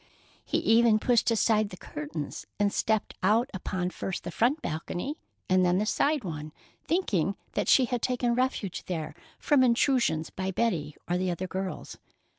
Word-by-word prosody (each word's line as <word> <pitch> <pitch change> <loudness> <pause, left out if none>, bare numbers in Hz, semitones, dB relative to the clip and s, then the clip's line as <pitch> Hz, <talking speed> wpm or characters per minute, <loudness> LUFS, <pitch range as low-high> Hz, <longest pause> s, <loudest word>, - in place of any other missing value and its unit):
He - - -1
even 225 -1 +4
pushed 240 +2 +2
aside 215 -2 +2
the 185 - -9
curtains 150 -1 -6
and 205 -1 +2
stepped 220 -1 0
out 220 +7 +2
upon 185 -1 -3
first 190 - -4
the - - -5
front 255 +7 +2
balcony 175 - -4 0.3
and 185 0 +4
then 180 0 +3
the 210 - +1
side 285 +4 +1
one, 155 -4 -5 0.3
thinking 205 - 0 0.2
that - - -1
she 260 - +6
had 245 -1 -2
taken 245 -1 +1
refuge 245 -7 -1
there 160 -4 -3 0.2
from 290 -3 +3
intrusion 235 - +3
by 190 0 -2
Betty 175 -8 -1
or 175 +1 0
the 185 0 0
other 180 +1 -2
girls. 190 0 -5
200 Hz, 165 wpm, -28 LUFS, 180-240 Hz, 0.3 s, she